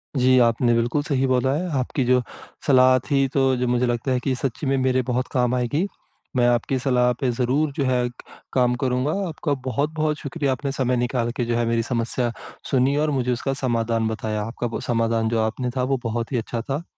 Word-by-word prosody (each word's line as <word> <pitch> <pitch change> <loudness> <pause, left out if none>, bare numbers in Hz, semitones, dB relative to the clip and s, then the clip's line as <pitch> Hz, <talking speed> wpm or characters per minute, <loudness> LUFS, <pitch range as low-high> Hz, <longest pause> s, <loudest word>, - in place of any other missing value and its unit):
जी। 130 -1 +4
आपने 120 0 +3
बिल्कुल 120 +5 +1
सही 135 -2 0
बोला 130 +1 +2
है, 175 +5 -2
आपकी 130 +2 -1
जो 125 +1 +4 0.5
सलाह 130 -2 +6
थी, 135 -1 +3
तो 135 -1 +2
जो 125 0 0
मुझे 125 +1 +2
लगता 120 +2 -1
है 130 - +2
कि 130 - 0
सच्ची 130 +3 -3
में 135 0 +2
मेरे 130 0 +2
बहुत 125 0 0
काम 125 -1 +1
आएगी। 135 +9 0 0.5
मैं 120 -1 +4
आपकी 120 +2 +1
सलाह 125 -1 +2
पे 130 - 0
ज़रूर, 130 +5 0
जो 140 - -2
है 125 -1 +1
क - - -16 0.4
काम 125 -1 +3
करूँगा। 130 +2 0 0.2
आपका 155 -2 -2
बहुत-बहुत 150 +4 -1
शुक्रिया, 145 -6 -2
आपने 135 +2 -2
समय 130 -2 0
निकाल 120 -1 0
के 120 - 0
जो 120 0 -1
है 120 - +1
मेरी 115 0 +1
समस्या, 120 0 -1 0.4
सुनी 135 +1 +3
और 155 +1 +1
मुझे 125 -3 0
उसका 130 +3 -1
समाधान 115 -4 0
बताया। 110 -1 -2
आपका 115 +2 -4
बो 115 - -4
समाधान 115 -1 0
जो 115 0 0
आपने 115 +3 -2
था, 125 - +1
वो 135 +1 +1
बहुत 115 +1 -3
ही 130 - 0
अच्छा 115 0 -3
था। 135 +7 -3
125 Hz, 210 wpm, -23 LUFS, 120-135 Hz, 0.5 s, सलाह